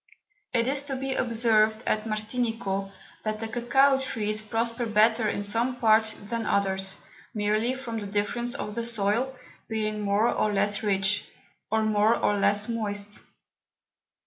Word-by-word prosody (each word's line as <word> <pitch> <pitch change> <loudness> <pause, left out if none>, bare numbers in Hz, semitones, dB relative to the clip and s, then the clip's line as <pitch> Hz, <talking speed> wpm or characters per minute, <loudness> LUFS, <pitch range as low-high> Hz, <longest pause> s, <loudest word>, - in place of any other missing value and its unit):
It 235 -1 +1
is 275 +1 +2
to 275 -2 -2
be 265 0 -2
observed 220 -2 +2
at 215 0 0
Martinico, 215 -3 -2 0.3
that 215 0 -3
the 225 - -3
Cocao 265 +4 +3
Trees 215 -4 -1
prosper 230 +2 -2
better 220 +1 +3
in 205 - -2
some 230 +5 0
Parts 220 -2 +4
than 225 +2 -5
others, 190 -1 +1 0.4
merely 215 +4 +1
from 235 -4 -5
the 205 - -5
Difference 210 +4 -1
of 210 - -5
the 235 +2 -2
Soil, 230 +3 0 0.3
being 215 -1 -2
more 205 +2 +2
or 215 -2 +1
less 205 +1 +2
rich, 200 -1 +1 0.4
or 220 +1 +1
more 215 +1 +3
or 205 0 +1
less 205 +1 +4
moist. 205 -3 -2
220 Hz, 145 wpm, -27 LUFS, 205-235 Hz, 0.4 s, Parts